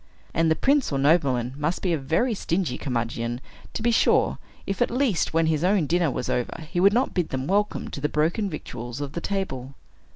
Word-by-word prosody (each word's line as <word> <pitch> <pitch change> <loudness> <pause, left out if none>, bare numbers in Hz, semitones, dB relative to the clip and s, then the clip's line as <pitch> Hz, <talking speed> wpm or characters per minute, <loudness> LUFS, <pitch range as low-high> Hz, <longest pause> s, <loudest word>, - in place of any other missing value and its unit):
And 165 0 +2
the 160 - +4
prince 275 - +2
or 140 - 0
nobleman 135 -4 +2
must 150 +4 -2
be 180 -3 +2
a - - +2
very 165 - +1
stingy 175 -7 -1
curmudgeon, 120 -2 -2 0.4
to - - -3
be 235 - +3
sure, 225 - +3 0.3
if, 195 +1 -3
at 245 - +3
least, 245 -6 +1
when 165 0 +2
his 160 0 +1
own 185 -2 +3
dinner 170 +1 +2
was 125 - -3
over, 125 +6 -2
he 175 - 0
would 195 +2 +6
not 245 +5 +1
bid 175 -3 0
them 130 0 -3
welcome 205 +4 0
to 140 - -6
the 150 - 0
broken 170 +8 0
victuals 120 -7 -6
from 145 -1 -4
the 170 - -5
table. 140 -11 -3
160 Hz, 215 wpm, -25 LUFS, 135-195 Hz, 0.4 s, would